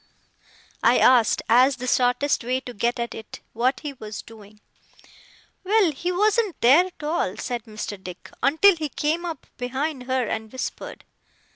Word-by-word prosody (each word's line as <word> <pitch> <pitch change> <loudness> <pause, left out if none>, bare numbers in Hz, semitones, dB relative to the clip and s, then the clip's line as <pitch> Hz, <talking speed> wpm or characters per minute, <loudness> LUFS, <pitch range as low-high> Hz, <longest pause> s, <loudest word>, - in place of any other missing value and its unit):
I - - +4
asked, 245 -4 +4
as 255 +4 +5
the 250 +1 -7
shortest 255 +2 +1
way 255 +2 0
to 245 - -9
get 235 +3 -1
at 235 0 -3
it, 220 - -9
what 250 +4 0
he 295 -2 -5
WAS 215 -4 -8
doing. 215 -2 -15 1.0
'Well, 395 -3 +3
he 340 +5 -3
wasn't 420 +1 +1
there 280 +10 +6
at 360 - -15
all,' 300 - -1
said 240 -2 -4
Mr. 210 -3 -7
Dick, 180 -1 -10
'until 320 +8 +5
he 310 -2 -3
came 315 +5 -1
up 330 -5 -6
behind 260 +2 -3
her, 260 -1 0
and 220 0 -4
whispered. 260 -1 -6
255 Hz, 160 wpm, -24 LUFS, 235-315 Hz, 1.0 s, there